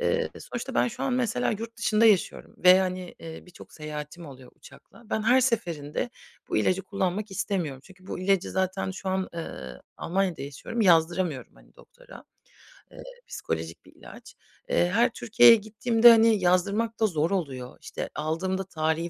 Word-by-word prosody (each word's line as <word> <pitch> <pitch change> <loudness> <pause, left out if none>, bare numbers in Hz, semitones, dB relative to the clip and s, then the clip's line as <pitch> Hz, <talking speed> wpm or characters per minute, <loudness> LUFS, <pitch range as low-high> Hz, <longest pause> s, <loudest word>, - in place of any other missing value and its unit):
eee, 480 0 0
sonuçta 245 +2 -6
ben - - +2
şu 240 +3 -8
an 265 - 0
mesela 205 - 0
yurtdışında 225 0 0
yaşıyorum 205 -5 +1
ve, 185 +1 +7
hani, 185 -1 -4
eee, 160 -1 -9
birçok 180 - -15
seyahatim 150 +2 -8
oluyor 130 -2 -13
uçakla. 235 - -17
Ben 220 - -1
her 250 +4 +4
seferinde 195 - -2 0.4
bu - - -1
ilacı 185 +1 +1
kullanmak 195 +1 -3
istemiyorum. 180 -9 -3
Çünkü 185 -1 -18
bu - - -5
ilacı 190 0 +1
zaten 190 0 -1
şu 190 0 -6
an, 190 0 -1
ııı, 65 - -8
Almanya'da 180 -4 -1
yaşıyorum, 145 - -6
yazdıramıyorum, 170 - +2
hani, - - -22
doktora. - - -16 0.7
Eee, - - -11 0.2
psikolojik 80 0 -5
bir - - -19
ilaç. - - -14 0.3
Eee, 175 - +2
her 235 +6 +3
Türkiye'ye 230 0 +6
gittiğimde, 225 +2 +4
hani, 225 -2 +5
yazdırmak 200 +6 +1
da 220 - +3
zor 165 -1 -1
oluyor. 135 -9 -4
İşte, - - -6
aldığımda 175 +5 -2
tarihi 160 -1 -2
190 Hz, 155 wpm, -26 LUFS, 160-220 Hz, 0.7 s, ve